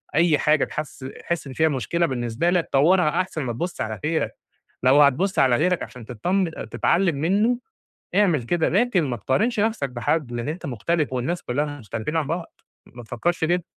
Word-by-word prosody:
أي 160 -1 +4
حاجة 150 -1 +3
تحس 150 -2 -6 0.2
تحس 170 -4 -3
إن 135 - -7
فيها 160 +4 +2
مشكلة 150 +5 0
بالنسبة 125 +3 -1
لك 175 -2 +1
طوّرها 160 +4 +4
أحسن 170 -5 -4
ما 120 -2 -3
تبص 170 +10 -4
على 110 -1 -3
غيرك، 160 +1 -1 0.5
لو 135 +3 +6
هتبص 145 +8 +2
على 130 -2 +5
غيرك 180 +5 +1
عشان 125 -3 -9
تطمّن 175 - 0 0.2
تتعلم 170 -3 +2
منه، 205 - +2 0.6
اعمل 180 -9 +3
كده 160 +7 +1
لكن 200 -2 +2
ما 130 -4 -2
تقارنش 205 - 0
نفسَك 215 - 0
بحد 125 +2 -1
لأن 120 +3 -3
أنت 165 +2 -5
مختلف 145 +4 -1
والناس 130 +8 -2
كلّها 145 +3 -2
مختلفين 110 - -4
عن 160 -3 0
بعض، 165 +3 -4 0.4
ما 120 - -9
تفكرش 160 +10 -1
كده. 175 +1 +1
155 Hz, 180 wpm, -23 LUFS, 130-175 Hz, 0.6 s, لو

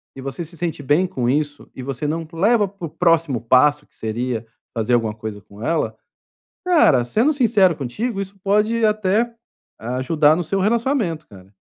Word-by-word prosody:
e 135 - -8
você 135 +5 -5
se 170 +1 -13
sente 165 -2 -3
bem 150 +7 +3
com 125 -8 -2
isso, 145 +1 -2
e 130 - -7
você 135 +2 -3
não 165 +2 -3
leva 205 +5 +3
para 190 -3 -7
o - - -11
próximo 165 -6 +2
passo 145 +5 +3
que - - -32
seria 115 +1 -3 0.3
fazer 115 +1 0
alguma 115 -2 0
coisa 110 -2 -6
com 100 +2 -15
ela, 165 +4 0 0.7
cara, 230 - +4
sendo 225 - +2
sincero 215 - +3
contigo 195 - -3
isso 195 +1 -8
pode 210 +3 +2
até 215 +2 +1 0.6
ajudar 150 +3 +3
no 175 - -1
seu 195 +4 -1
relacionamento, 220 - 0
cara, 95 0 -16
160 Hz, 175 wpm, -21 LUFS, 130-200 Hz, 0.7 s, cara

